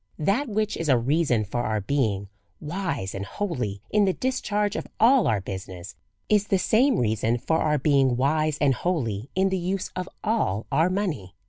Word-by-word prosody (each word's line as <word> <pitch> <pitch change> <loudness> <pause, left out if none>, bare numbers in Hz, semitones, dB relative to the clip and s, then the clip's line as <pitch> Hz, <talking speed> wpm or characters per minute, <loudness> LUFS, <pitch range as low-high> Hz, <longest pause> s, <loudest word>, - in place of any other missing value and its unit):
That 205 - 0
which 215 0 -1
is 165 -2 -2
a 130 - +5
reason 125 -3 +1
for 120 +5 -2
our 110 -2 -1
being 105 -3 -1 0.3
wise 150 - -3
and 95 - -4
holy 120 - -4
in 210 -1 +4
the 190 - +2
discharge 210 -5 -1
of - - -4
all 250 +2 +5
our 110 -3 +2
business, 95 -2 -7 0.3
is 210 -1 +2
the 195 - +2
same 235 +6 +3
rea 110 -3 +1
son 110 +2 0
for 160 +7 0
our 150 -1 +2
being 135 -3 +2
wise 155 +3 +1
and 140 -2 +3
holy 125 - -2
in 190 +1 +2
the 190 -1 -1
use 185 +2 -2
of 185 0 -4
all 210 - 0
our 160 +5 +3
money. 165 - -3
150 Hz, 190 wpm, -25 LUFS, -, 0.3 s, a